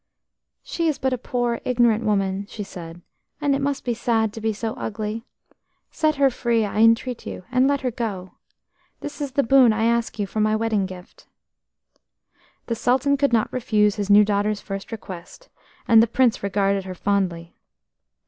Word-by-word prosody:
"She 335 Hz, -1 st, -2 dB
is 305 Hz, -, 0 dB
but 265 Hz, 0 st, -1 dB
a -, -, -1 dB
poor 240 Hz, -1 st, -2 dB
ignorant 235 Hz, -3 st, +2 dB
woman," 200 Hz, -2 st, 0 dB
she 210 Hz, -, -6 dB
said, 175 Hz, -3 st, -10 dB, 0.4 s
"and 290 Hz, -2 st, +1 dB
it 275 Hz, -, 0 dB
must 280 Hz, -1 st, -2 dB
be 240 Hz, -, 0 dB
sad 225 Hz, -2 st, 0 dB
to 225 Hz, -, -8 dB
be 220 Hz, 0 st, 0 dB
so 220 Hz, +1 st, -4 dB
ugly. 220 Hz, +2 st, -5 dB, 0.7 s
Set 310 Hz, -1 st, +1 dB
her 275 Hz, -1 st, +3 dB
free, 235 Hz, -2 st, 0 dB
I 205 Hz, +1 st, -3 dB
entreat 230 Hz, +2 st, +2 dB
you, -, -, -7 dB
and 255 Hz, +1 st, +3 dB
let 280 Hz, 0 st, +1 dB
her 255 Hz, -2 st, -1 dB
go. 205 Hz, -6 st, -4 dB, 0.7 s
This 295 Hz, +1 st, -7 dB
is 280 Hz, -3 st, -4 dB
the 280 Hz, -, +2 dB
boon 260 Hz, -1 st, +5 dB
I 220 Hz, +1 st, -1 dB
ask 235 Hz, 0 st, 0 dB
you 205 Hz, -, -1 dB
for 215 Hz, -, -5 dB
my 215 Hz, 0 st, +2 dB
wedding 215 Hz, -3 st, 0 dB
gift." 185 Hz, -1 st, -13 dB, 1.4 s
The 235 Hz, -, -2 dB
Sultan 255 Hz, +5 st, +2 dB
could 280 Hz, -1 st, +1 dB
not 225 Hz, -2 st, +1 dB
refuse 210 Hz, -4 st, +1 dB
his 205 Hz, -1 st, -3 dB
new 205 Hz, +1 st, +7 dB
daughter's 205 Hz, 0 st, 0 dB
first 195 Hz, +1 st, -7 dB
request, 200 Hz, -, -9 dB, 0.4 s
and 225 Hz, -1 st, +7 dB
the 230 Hz, -, +3 dB
Prince 240 Hz, 0 st, +2 dB
regarded 200 Hz, -1 st, 0 dB
her 185 Hz, -1 st, -6 dB
fondly. 180 Hz, -4 st, -1 dB
225 Hz, 180 wpm, -23 LUFS, 200-250 Hz, 1.4 s, new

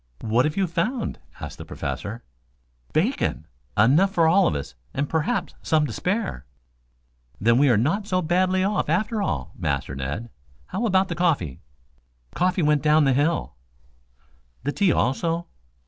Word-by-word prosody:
"What 115 Hz, +3 st, +2 dB
have 150 Hz, +3 st, -2 dB
you 195 Hz, -, +3 dB
found?" 190 Hz, +9 st, -2 dB, 0.2 s
asked -, -, -7 dB
the -, -, -6 dB
Professor. 115 Hz, +4 st, -5 dB, 0.7 s
"Bacon. 180 Hz, -, 0 dB, 0.3 s
Enough 145 Hz, -, +5 dB
for 165 Hz, -3 st, +3 dB
all 190 Hz, +4 st, +5 dB
of -, -, 0 dB
us 70 Hz, -1 st, -5 dB, 0.2 s
and 140 Hz, +1 st, 0 dB
perhaps 160 Hz, 0 st, -1 dB
some 155 Hz, -1 st, +2 dB
to 125 Hz, -, -5 dB
spare." 195 Hz, -, -2 dB, 1.0 s
"Then, 115 Hz, +3 st, +4 dB
we 145 Hz, 0 st, +5 dB
are 120 Hz, -, +4 dB
not 165 Hz, -, 0 dB
so 185 Hz, -3 st, +1 dB
badly 185 Hz, +2 st, +2 dB
off 200 Hz, -5 st, 0 dB
after 210 Hz, +6 st, 0 dB
all, 70 Hz, -, -2 dB
Master -, -, -2 dB
Ned. 70 Hz, -, -4 dB, 0.3 s
How 230 Hz, -, -2 dB
about 190 Hz, -1 st, +3 dB
the -, -, -1 dB
coffee?" 155 Hz, -, 0 dB, 0.7 s
"Coffee 180 Hz, 0 st, +1 dB
went 150 Hz, -1 st, +3 dB
down 155 Hz, 0 st, +4 dB
the 135 Hz, -2 st, +3 dB
hill." 150 Hz, +5 st, 0 dB, 1.1 s
"The 145 Hz, -, 0 dB
tea 195 Hz, +2 st, +2 dB
also?" 165 Hz, +6 st, 0 dB
160 Hz, 155 wpm, -24 LUFS, 125-185 Hz, 1.1 s, Enough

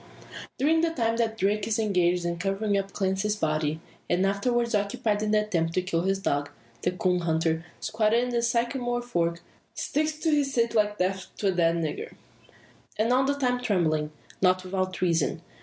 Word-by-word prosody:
During 320 Hz, +4 st, +3 dB
the 335 Hz, -, +2 dB
time 230 Hz, -7 st, 0 dB
that 225 Hz, -1 st, 0 dB
Darke 205 Hz, +1 st, +1 dB
is 220 Hz, -, +1 dB
engaged 180 Hz, -5 st, +1 dB
in 170 Hz, 0 st, -2 dB
covering 200 Hz, +3 st, 0 dB
up 195 Hz, 0 st, -1 dB
Clancy's 195 Hz, +2 st, 0 dB
body, 155 Hz, -3 st, -1 dB, 0.3 s
and 180 Hz, +2 st, +2 dB
afterwards 235 Hz, +4 st, 0 dB
occupied 205 Hz, +1 st, 0 dB
in 215 Hz, -, 0 dB
the 210 Hz, 0 st, +3 dB
attempt 165 Hz, -6 st, -1 dB
to 185 Hz, -, +1 dB
kill 170 Hz, -2 st, 0 dB
his 195 Hz, +2 st, +1 dB
dog, 145 Hz, -7 st, -1 dB, 0.3 s
the -, -, +1 dB
coon 180 Hz, -1 st, 0 dB
hunter, 160 Hz, -1 st, 0 dB, 0.2 s
squatted 220 Hz, +2 st, +1 dB
in 250 Hz, -, -2 dB
the 240 Hz, -1 st, 0 dB
sycamore 240 Hz, +1 st, 0 dB
fork, 170 Hz, -7 st, -1 dB, 0.3 s
sticks 305 Hz, +2 st, -1 dB
to 310 Hz, +1 st, -1 dB
his 285 Hz, -2 st, +1 dB
seat 235 Hz, -1 st, +2 dB
like 210 Hz, -2 st, +2 dB
"death 190 Hz, +1 st, -1 dB
to 200 Hz, -, +1 dB
a -, -, +3 dB
dead 170 Hz, -2 st, +2 dB
nigger." 170 Hz, -, -3 dB, 0.8 s
And 225 Hz, +3 st, +2 dB
all 260 Hz, +1 st, +3 dB
the 280 Hz, +1 st, +1 dB
time 250 Hz, -3 st, 0 dB
trembling. 160 Hz, -9 st, +1 dB, 0.3 s
Not 185 Hz, 0 st, +3 dB
without 185 Hz, 0 st, -2 dB
reason. 170 Hz, -4 st, +1 dB
200 Hz, 185 wpm, -27 LUFS, 175-235 Hz, 0.8 s, During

